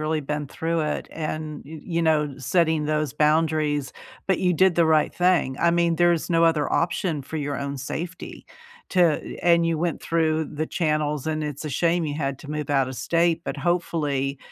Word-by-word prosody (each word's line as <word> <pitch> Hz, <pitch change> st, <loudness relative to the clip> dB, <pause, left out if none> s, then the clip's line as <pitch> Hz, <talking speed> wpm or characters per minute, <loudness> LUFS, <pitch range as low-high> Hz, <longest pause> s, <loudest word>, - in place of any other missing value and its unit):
really 155 Hz, 0 st, 0 dB
been 150 Hz, 0 st, -3 dB
through 165 Hz, +4 st, -2 dB
it, 150 Hz, -1 st, -2 dB
and, 155 Hz, -1 st, -5 dB
y 155 Hz, +1 st, -9 dB
you 170 Hz, -2 st, -1 dB
know, 150 Hz, -3 st, +2 dB
setting 160 Hz, +3 st, +1 dB
those 150 Hz, -2 st, -1 dB
boundaries, 150 Hz, -2 st, +1 dB, 0.4 s
but 190 Hz, -, +2 dB
you 180 Hz, -1 st, +2 dB
did 185 Hz, +1 st, +3 dB
the 170 Hz, -, +4 dB
right 155 Hz, -1 st, +3 dB
thing, 175 Hz, -7 st, +2 dB
I 170 Hz, -, +4 dB
mean, 170 Hz, -1 st, +2 dB
there's 175 Hz, -1 st, +2 dB
no 165 Hz, 0 st, +4 dB
other 160 Hz, -3 st, +2 dB
option 165 Hz, -3 st, 0 dB
for 160 Hz, -, -7 dB
your 145 Hz, -2 st, -2 dB
own 140 Hz, 0 st, -4 dB
safety. 165 Hz, +6 st, -6 dB, 0.5 s
To 175 Hz, -5 st, +2 dB
and 170 Hz, -1 st, +4 dB
you 165 Hz, -1 st, +1 dB
went 170 Hz, -1 st, -1 dB
through 160 Hz, -2 st, +1 dB
the 155 Hz, +2 st, -2 dB
channels 150 Hz, -4 st, -1 dB
and 155 Hz, -1 st, -1 dB
it's 150 Hz, 0 st, -5 dB
a -, -, -2 dB
shame 170 Hz, +4 st, +1 dB
you 145 Hz, -, -3 dB
had 140 Hz, -3 st, -2 dB
to 145 Hz, -, -9 dB
move 150 Hz, -1 st, -4 dB
out 135 Hz, -2 st, +2 dB
of 130 Hz, -, -6 dB
state, 165 Hz, +5 st, +1 dB
but -, -, -3 dB
hopefully, 145 Hz, -4 st, -1 dB
155 Hz, 195 wpm, -24 LUFS, 150-170 Hz, 0.5 s, the